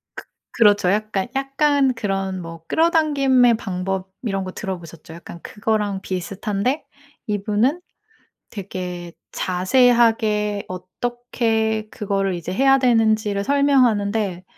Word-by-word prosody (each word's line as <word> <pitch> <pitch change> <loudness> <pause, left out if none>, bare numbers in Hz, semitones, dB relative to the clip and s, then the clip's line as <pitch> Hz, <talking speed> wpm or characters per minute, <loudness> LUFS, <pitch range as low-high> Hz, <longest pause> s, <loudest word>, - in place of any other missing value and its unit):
그 - - -8 0.3
그렇죠. 205 -5 +4
약간 210 -1 -1
약간 275 0 +2
그런 195 -4 -3
뭐 165 -1 -9
끌어당김의 280 -7 +3
방법 190 -1 -4
이런 195 -4 -2
거 185 - -6
들어보셨죠. 170 -5 -7
약간 170 0 -10
그거랑 210 -2 -2
비슷한데 200 - -2 0.4
이분은 210 - 0 0.7
되게 180 -3 -6 0.2
자세하게 210 0 +2
어떻게 220 +3 -2
그거를 195 -2 -1
이제 175 +1 -5
해야 270 +5 +4
되는 225 -4 +3
지를 205 -2 -3
설명하는데 225 -9 +2
210 Hz, 260 characters per minute, -21 LUFS, 190-245 Hz, 0.7 s, 그렇죠